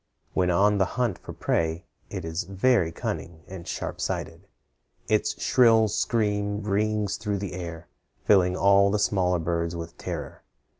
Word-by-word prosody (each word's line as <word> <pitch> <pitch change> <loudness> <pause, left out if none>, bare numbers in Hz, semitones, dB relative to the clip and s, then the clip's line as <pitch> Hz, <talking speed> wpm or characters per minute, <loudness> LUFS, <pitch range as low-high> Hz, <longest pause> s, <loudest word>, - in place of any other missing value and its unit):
When 90 -1 +2
on 100 +3 +3
the 95 - +4
hunt 120 -7 0
for - - -9
prey, 80 +1 -1 0.2
it - - -5
is 80 +1 -2
very 95 -1 +2
cunning 80 -1 -5
and 90 -2 -9
sharp - - -4
sighted. - - -4 0.6
Its 110 0 +1
shrill 115 -3 +5
scream 105 -2 0
rings 105 0 0
through 105 -1 -2
the 100 -1 -5
air, 85 -2 -7 0.4
filling 90 -3 +4
all 100 0 +5
the 105 - +1
smaller 95 -3 +1
birds 85 0 -2
with 85 0 -7
terror. - - -6
100 Hz, 150 wpm, -26 LUFS, 85-105 Hz, 0.6 s, shrill